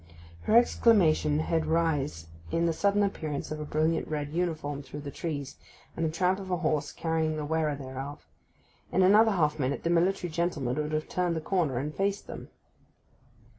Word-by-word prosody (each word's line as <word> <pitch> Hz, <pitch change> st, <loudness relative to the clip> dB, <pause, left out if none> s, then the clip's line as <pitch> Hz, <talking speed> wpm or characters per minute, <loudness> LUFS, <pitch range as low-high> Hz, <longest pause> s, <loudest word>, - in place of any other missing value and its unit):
Her 225 Hz, -, +5 dB
exclamation 180 Hz, -11 st, +4 dB
had 160 Hz, 0 st, 0 dB
rise 150 Hz, -, 0 dB, 0.2 s
in 165 Hz, -, +1 dB
the 165 Hz, -, +2 dB
sudden 200 Hz, +4 st, +2 dB
appearance 155 Hz, -8 st, -3 dB
of 155 Hz, -, -4 dB
a 150 Hz, -, -4 dB
brilliant 155 Hz, +2 st, 0 dB
red 150 Hz, -2 st, -3 dB
uniform 155 Hz, -4 st, -2 dB
through 145 Hz, +1 st, -8 dB
the 140 Hz, -1 st, -6 dB
trees, 145 Hz, -5 st, -5 dB, 0.4 s
and 165 Hz, -, -2 dB
the 160 Hz, -, +2 dB
tramp 180 Hz, +4 st, +1 dB
of 190 Hz, -1 st, -8 dB
a 180 Hz, -, +1 dB
horse 155 Hz, -3 st, 0 dB
carrying 160 Hz, -1 st, -1 dB
the 150 Hz, -, -3 dB
wearer 155 Hz, -1 st, 0 dB
thereof. 135 Hz, +1 st, -7 dB, 0.7 s
In 185 Hz, -, +3 dB
another 210 Hz, +3 st, +6 dB
half 155 Hz, -4 st, +1 dB
minute 135 Hz, +1 st, -1 dB
the 170 Hz, -, +1 dB
military 175 Hz, +1 st, +1 dB
gentleman 155 Hz, -6 st, -1 dB
would 150 Hz, 0 st, -2 dB
have 155 Hz, 0 st, -1 dB
turned 180 Hz, -2 st, 0 dB
the -, -, -1 dB
corner, 160 Hz, -6 st, 0 dB
and 145 Hz, +4 st, -3 dB
faced 200 Hz, +2 st, -1 dB
them. -, -, -9 dB
160 Hz, 180 wpm, -28 LUFS, 150-180 Hz, 0.7 s, another